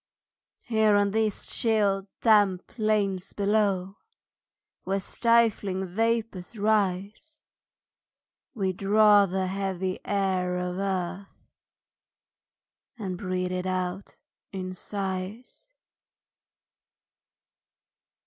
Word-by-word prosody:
Here 220 -3 +3
on 205 0 +3
these 215 -1 -1
chill, 205 -4 +1
damp 205 -5 +4
plains 205 -4 -1
below, 200 -2 0 0.9
Where 195 +1 -1
stifling 210 -3 +1
vapors 225 0 -2
rise, 210 - -1 1.2
We 190 -4 0
draw 205 +1 +5
the 190 +1 -1
heavy 190 -1 -2
air 185 -3 0
of 180 +1 -3
earth, 190 0 -2 1.7
And 195 -5 -4
breathe 185 -1 -2
it 185 0 -2
out 185 +1 -3 0.3
in 185 -1 -5
sighs. 195 - -5
195 Hz, 80 wpm, -27 LUFS, 185-215 Hz, 1.7 s, draw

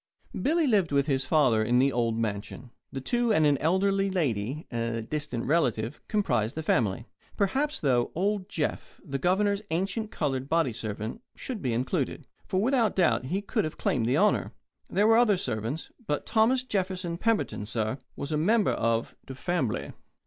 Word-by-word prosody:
Billy 320 +2 +2
lived 205 - +2
with 140 -1 +3
his 135 -2 0
father 130 -8 +3
in 120 +3 +2
the 135 +2 +4
old 115 -2 0
mansion. 110 +2 -4 0.2
The 135 - -5
two 240 - +1
and 160 -7 +4
an 145 -2 +3
elderly 195 +4 +2
lady 140 - -1
a 115 -1 -2
distant 145 -2 -3
relative 125 -5 0
comprised 130 - 0
the 160 - -3
family. 115 -5 +1 0.3
Perhaps, 270 +9 0
though, 125 -4 +2
old 200 +2 -1
Jeff, 155 -6 -3
the 135 -4 -3
Governor's 200 +5 +2
ancient 195 +6 -1
coloured 135 - -2
body 165 -7 +2
servant, 110 - -5
should 245 -5 -6
be 125 - -1
included. 125 +3 -1 0.3
Without 225 +4 +2
doubt, 175 -8 +2
he 190 +9 -2
could - - 0
have 155 - -4
claimed 115 -4 0
the 130 +4 +2
honour. 210 +4 +2 0.4
There 205 - +2
were 225 +1 +6
other 225 -5 +4
servants, 115 - -3 0.2
but 150 - -1
Thomas 240 +3 +3
Jefferson 185 -6 -2
Pemberton, 220 - 0
sah, 110 +2 -2 0.2
was 140 - -5
a 150 - +1
member 210 +7 +3
of 115 0 0
"de 135 - -7
fambly." 165 -6 -2
155 Hz, 170 wpm, -28 LUFS, 120-200 Hz, 0.4 s, were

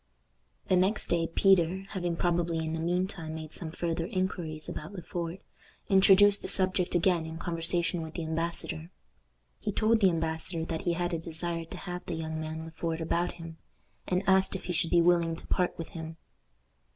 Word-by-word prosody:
The 185 - +4
next 190 +4 +3
day 170 -1 +2
Peter, 190 +1 +3
having 175 -4 -1
probably 170 -1 +1
in 160 0 -2
the 165 - -2
mean 180 +3 +1
time 160 -5 -6
made 155 -1 -7
some 165 - -4
farther 165 0 -2
inquiries 175 -5 -2
about 155 +6 -6
Le 180 -3 -7
Fort, 170 +2 -4 0.5
introduced 200 +1 +6
the - - -6
subject 185 -2 +1
again 175 -2 +2
in 160 0 -6
conversation 170 0 0
with 160 0 -7
the 170 - -2
embassador. 160 - -3 0.7
He - - -2
told 220 +2 +3
the 195 -3 +6
embassador 160 0 -2
that 165 -1 -4
he 175 - +2
had 175 +1 -1
a 165 - 0
desire 165 +1 -3
to - - -9
have 180 -1 -6
the - - -2
young 160 -1 -3
man 160 +1 -5
Le 165 - -9
Fort 165 0 -3
about 170 +2 0
him, 165 -1 -10 0.5
and 185 +1 +1
asked 190 0 +4
if 190 - -5
he 180 - -3
should 165 0 +2
be 175 - +5
willing 170 -1 +3
to - - -11
part 180 -1 0
with 165 - -6
him. 160 -1 -7
170 Hz, 195 wpm, -30 LUFS, 160-180 Hz, 0.7 s, introduced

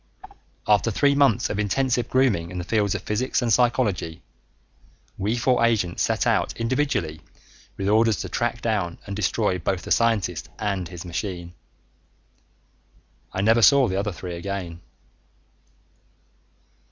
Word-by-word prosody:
After 105 +1 +3
three 140 +6 +2
months 140 -6 +2
of 105 - -3
intensive 120 +3 0
grooming 120 -11 +2
in 90 - -7
the 90 - -3
fields 105 +1 0
of - - -4
physics 120 +5 -1
and 115 -2 +2
psychology, 105 -9 0 0.9
we 105 +5 -1
four 125 0 +2
agents 105 -7 +1
set - - +1
out - - +1
individually 115 - -1 0.6
with 95 - -2
orders 110 +1 +3
to 95 - -5
track 120 +4 -2
down 100 -7 -1
and 100 - -5
destroy 105 -1 0
both 90 +3 -2
the - - -8
scientist 110 -8 +1
and 100 -4 -2
his 90 -1 -9
machine. 85 0 -5 1.8
I 95 - -2
never 115 +3 +4
saw 140 +2 +6
the 95 - -2
other 105 +1 -2
three 90 0 -7
again.... 85 -1 -5
105 Hz, 140 wpm, -24 LUFS, 90-115 Hz, 1.8 s, saw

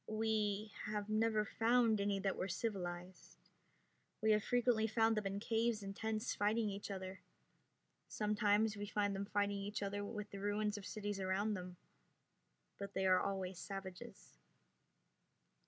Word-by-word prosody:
"We 215 -1 0
have 210 -1 -2
never 215 0 +2
found 225 -1 +3
any 200 0 +1
that 195 -1 0
were 185 - -2
civilized. 180 -3 -4 0.8
We 220 0 +3
have 210 -1 +4
frequently 240 -3 +3
found 225 +1 +3
them 210 -2 0
in 195 +1 -2
caves 225 0 +1
and 195 0 -5
tents 220 +1 -1
fighting 210 +1 +1
each 200 +1 -5
other. 190 -1 -5 0.9
Sometimes 210 0 +2
we 205 0 -4
find 205 -1 +1
them 195 +1 -2
fighting 205 -1 +1
each 205 +1 -3
other 205 +1 -2
with 210 0 -5
the 200 - -6
ruins 205 +1 0
of 205 -2 -6
cities 205 -1 -3
around 195 +3 +1
them, 180 -2 -6 1.0
but 200 0 -6
they 190 - +1
are 185 -1 +6
always 190 -2 -2
savages." 190 -2 -8
205 Hz, 150 wpm, -38 LUFS, 195-215 Hz, 1.0 s, are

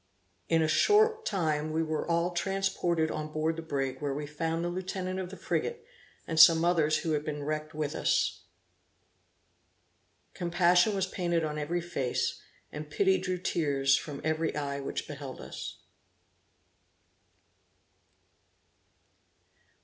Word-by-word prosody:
In 165 -1 +4
a - - +2
short 440 - +3
time 155 -5 0
we 160 +1 +1
were 155 +1 -3
all 170 +1 +1
transported 175 -3 0
on 155 0 -4
board 155 +1 0
the 165 - -5
brig, 135 -4 -3
where 140 -2 -1
we 150 +1 -3
found 165 +3 -2
the - - 0
lieutenant 185 +1 -3
of 185 -1 -4
the 195 - -9
frigate, 470 -1 -2 0.4
and 160 -1 -1
some 165 +1 +8
others 160 -3 +3
who 165 - -2
had 150 -1 0
been 150 -1 -4
wrecked 155 +1 -3
with 150 -1 -2
us. - - 0 1.9
Compassion 175 +3 +3
was 190 -1 +1
painted 175 -3 -1
on 150 -1 -2
every 170 +4 -1
face, 140 -7 -2 0.3
and 150 0 -7
pity 190 +4 +2
drew 185 0 -2
tears 140 -6 +2
from 145 -1 -4
every 160 +1 0
eye 140 -1 -2
which 135 - -4
beheld 140 -3 -7
us. - - -7
160 Hz, 135 wpm, -30 LUFS, 150-180 Hz, 1.9 s, some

